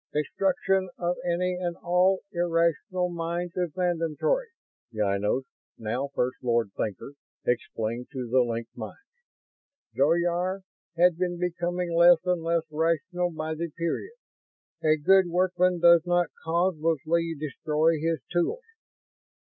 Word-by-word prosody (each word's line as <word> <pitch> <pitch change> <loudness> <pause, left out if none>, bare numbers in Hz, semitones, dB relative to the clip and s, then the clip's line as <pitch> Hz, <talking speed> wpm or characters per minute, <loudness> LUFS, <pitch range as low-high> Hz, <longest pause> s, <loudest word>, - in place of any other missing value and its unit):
"Destruction 190 +4 0
of 175 0 -1
any 180 +1 0
and 175 -1 -2
all 180 +2 +3
irrational 175 +2 0
minds 170 +1 -3
is 180 -2 0
mandatory," 180 - 0 0.4
Ynos, 105 +3 0 0.3
now 120 +5 -2
First 125 +1 0
Lord 115 -4 +1
Thinker, 110 +6 -4 0.3
explained 120 -1 -2
to 130 -4 -5
the 130 +3 +3
linked 115 -1 -3
minds. 110 -3 -7 1.0
"Zoyar 175 +5 +1 0.4
had 175 -1 +4
been 180 -1 -1
becoming 175 0 -2
less 170 +1 +7
and 180 -2 +1
less 165 0 +1
rational 170 +3 0
by 160 -1 -4
the 165 +2 -4
period. 170 - -3 0.7
A 155 0 +4
good 190 +5 +5
workman 180 0 +1
does 170 0 +7
not 175 -1 +2
causelessly 165 -1 0
destroy 155 +2 0
his 165 +1 -1
tools. 175 - 0
170 Hz, 120 wpm, -27 LUFS, 150-180 Hz, 1.0 s, less